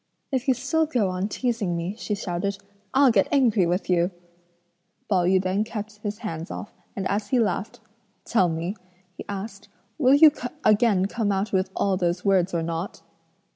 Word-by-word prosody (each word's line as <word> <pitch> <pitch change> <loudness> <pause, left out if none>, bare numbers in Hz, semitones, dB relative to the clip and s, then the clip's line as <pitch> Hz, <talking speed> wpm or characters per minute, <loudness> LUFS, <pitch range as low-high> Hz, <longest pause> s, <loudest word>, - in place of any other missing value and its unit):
"If 265 0 -1
you 260 - +4
still 275 +6 0
go 240 -10 +1
on 185 +2 -2
teasing 220 -8 -1
me," 175 +4 -3
she 215 -2 -3
shouted, 195 0 -3 0.3
"I'll 270 -1 +5
get 200 -4 +3
angry 230 - +3
with 180 +3 -1
you!" 175 -1 +2 1.0
Pao 185 -4 +2
yü 185 +1 +4
then 190 +3 0
kept 215 -1 -6
his 205 -1 -4
hands 165 -2 -5
off, - - -7 0.2
and 190 -1 -2
as 205 +1 -1
he 250 +3 +2
laughed, 220 +2 -1 0.5
"Tell 190 -7 +2
me," 165 +4 -3 0.4
he - - -8
asked, 200 0 -6 0.3
"will 270 -1 +5
you 305 +1 +8 0.3
again 210 -3 +4
come 205 0 -1
out 200 +3 -1
with 190 0 +1
all 195 -2 +1
those 175 0 -1
words 190 -2 +3
or 170 -1 -1
not?" 165 +3 -4
200 Hz, 175 wpm, -25 LUFS, 185-230 Hz, 1.0 s, you